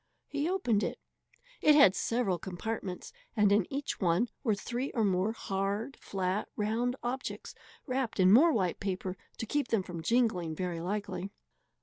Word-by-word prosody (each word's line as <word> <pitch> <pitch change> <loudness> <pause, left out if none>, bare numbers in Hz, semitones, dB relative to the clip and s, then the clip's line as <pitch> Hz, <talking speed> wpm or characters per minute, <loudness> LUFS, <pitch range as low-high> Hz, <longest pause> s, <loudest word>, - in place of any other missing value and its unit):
He 290 +3 -2
opened 250 - +1
it. - - -2 0.6
It 300 -1 +6
had 200 -11 +7
several 220 -6 0
compartments, 190 - -5 0.2
and 205 -1 +5
in 205 -2 +2
each 280 +1 -3
one 185 +5 +2
were 220 -5 +2
three 245 +6 -3
or 225 - +2
more 190 +2 +2
hard, 200 +4 -2
flat, 190 +1 -2
round 230 +4 0
objects 250 +2 -4 0.3
wrapped 255 -5 -2
in 185 +1 +6
more 315 +9 +7
white 185 - 0
paper 190 -1 -3 0.2
to - - -3
keep 290 +3 0
them 225 -5 +1
from 175 -2 -6
jingling, 190 -7 +1
very 175 -1 -3
likely. 195 0 -3
210 Hz, 155 wpm, -31 LUFS, 185-245 Hz, 0.6 s, had